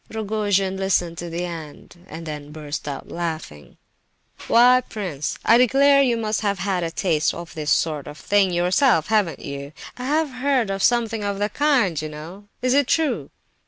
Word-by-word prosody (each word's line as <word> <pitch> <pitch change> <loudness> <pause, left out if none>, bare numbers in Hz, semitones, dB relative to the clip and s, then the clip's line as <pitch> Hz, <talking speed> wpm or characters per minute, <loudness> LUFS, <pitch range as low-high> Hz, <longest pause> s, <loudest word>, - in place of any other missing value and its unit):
'" - - -35
Rogojin 205 -3 -1
listened 180 -3 0
to 175 - -5
the 170 +2 -3
end, 170 +1 -9
and 165 +1 -8
then 150 -2 -7
burst 150 -1 -6
out 140 -2 -6
laughing: 160 - -6 0.7
"Why, 250 +2 +6
prince, 175 -9 -4
I 230 +1 +6
declare 275 +3 +5
you 245 -4 +2
must 215 -1 -1
have 200 -2 0
had 190 -1 -1
a 165 - -1
taste 165 -2 0
of 170 0 -8
this 155 -3 -4
sort 150 -3 +1
of 150 0 -9
thing 200 +1 +2
yourself—haven't 180 - +2
you? 140 +1 -7 0.2
I 250 - -6
have 300 +1 +1
heard 255 -3 0
tell 195 - -1
of - - -7
something 230 -2 +1
of 200 -1 -2
the 205 +1 -1
kind, 245 - +1
you 155 - -5
know; 165 +7 -10 0.2
is 255 0 +2
it 280 -2 +3
true?" 320 0 0
195 Hz, 185 wpm, -22 LUFS, 165-230 Hz, 0.7 s, Why